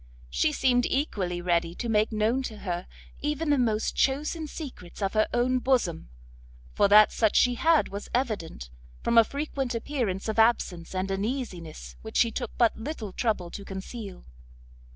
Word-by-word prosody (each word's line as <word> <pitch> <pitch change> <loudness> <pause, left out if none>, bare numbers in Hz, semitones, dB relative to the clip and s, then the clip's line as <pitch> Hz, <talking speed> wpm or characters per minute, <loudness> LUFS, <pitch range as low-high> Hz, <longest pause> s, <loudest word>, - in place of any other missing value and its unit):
She 310 - +2
seemed 250 -4 +2
equally 190 - -1
ready 170 -1 +1
to 240 - -4
make 215 0 +2
known 220 +4 +1
to 215 - -11
her 175 -1 -3 0.3
even 300 +1 -1
the 285 - +3
most 220 -3 0
chosen 300 +4 0
secrets 270 - -9
of 195 -2 -1
her 215 0 +3
own 255 +1 +2
bosom, 245 - 0 0.6
for - - +4
that 210 +1 +7
such 220 -2 +1
she 245 - +5
had 320 +5 +3
was 200 +1 -7
evident, 200 - -2 0.3
from 235 - +5
a - - +8
frequent 275 -1 -3
appearance 230 -6 -2
of 220 0 -1
absence 190 -7 +2
and 190 +1 -1
uneasiness 190 - -4
which - - -5
she 230 - +4
took 245 -1 -3
but 235 -2 +3
little 225 -5 -6
trouble 200 -7 -1
to 200 - -7
conceal. 195 0 -8
225 Hz, 165 wpm, -27 LUFS, 190-255 Hz, 0.6 s, a